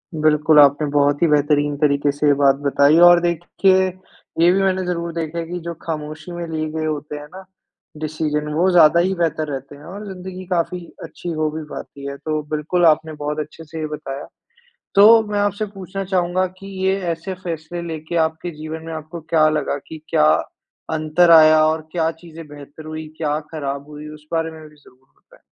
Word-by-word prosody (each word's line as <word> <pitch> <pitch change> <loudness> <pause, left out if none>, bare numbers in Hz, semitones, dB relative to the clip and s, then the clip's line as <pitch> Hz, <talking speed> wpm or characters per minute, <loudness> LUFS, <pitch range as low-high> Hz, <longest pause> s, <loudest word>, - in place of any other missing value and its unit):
बिल्कुल, 155 0 +4
आपने 145 +1 +5
बहुत 145 0 +2
ही 170 - +5
बेहतरीन 145 -1 +2
तरीके 145 -1 +2
से 145 +1 -1
ये 145 - +6
बात 135 -1 +5
बताई 140 +2 +4
और 175 0 +7
देखिए, 175 +3 +2 0.5
ये 170 +1 +6
भी 195 +2 +2
मैंने 190 -1 0
ज़रूर 170 -1 -3
देखा 165 0 -4
है 165 - -3
कि 175 +2 -5
जो 170 - -3
खामोशी 155 +1 -6
में 175 -1 -5
लिए 155 -1 -3
गए 160 0 -3
होते 150 -1 -4
हैं 145 - -9
ना, 190 +1 -10 0.5
डिसीज़न, 150 -1 -2
वो 175 +5 +2
ज़्यादा 170 -2 +6
ही 185 +2 +1
बेहतर 160 -3 -1
रहते 135 +1 -7
हैं 145 - -15
और 200 +5 -8
ज़िंदगी 185 0 -8
काफ़ी 180 +1 0 0.2
अच्छी 175 - -8
हो 155 -1 -1
भी 155 +1 -6
पाती 140 0 -9
है। 140 0 -6
तो 155 +1 -3
बिल्कुल 170 +4 +1
आपने 160 0 +3
बहुत 150 +1 -2
अच्छे 155 +2 -7
से 160 +1 -9
ये 155 - -2
बताया। 140 -2 -7 0.7
तो 220 +3 +8
मैं 205 - 0
आपसे 205 +1 -1
पूछना 195 0 -6
चाहूँगा 185 0 0
कि 195 - -11 0.2
ये 190 +1 +2
ऐसे 170 +3 -6
फ़ैसले 170 0 -5
लेके 160 +1 -5
आपके 160 +2 -6
जीवन 155 +1 -7
में 165 - -6
आपको 160 +2 -7
क्या 155 -1 +3
लगा 155 -2 -1
कि 160 -1 -10
क्या - - +3 0.7
अंतर 155 +2 +3
आया 155 -1 +7
और 155 0 -1
क्या 165 -2 +1
चीज़ें 165 -1 -12
बेहतर 145 +1 -12
हुईं? 155 0 -6
क्या 150 -2 -1
खराब 140 -2 -4
हुईं? 150 0 -9
उस 150 0 -16
बारे 165 0 0
में 160 -1 -12
भी 150 - -21
ज़रूर 130 -2 -23
बताएँ। - - -24
155 Hz, 195 wpm, -20 LUFS, 150-175 Hz, 0.7 s, तो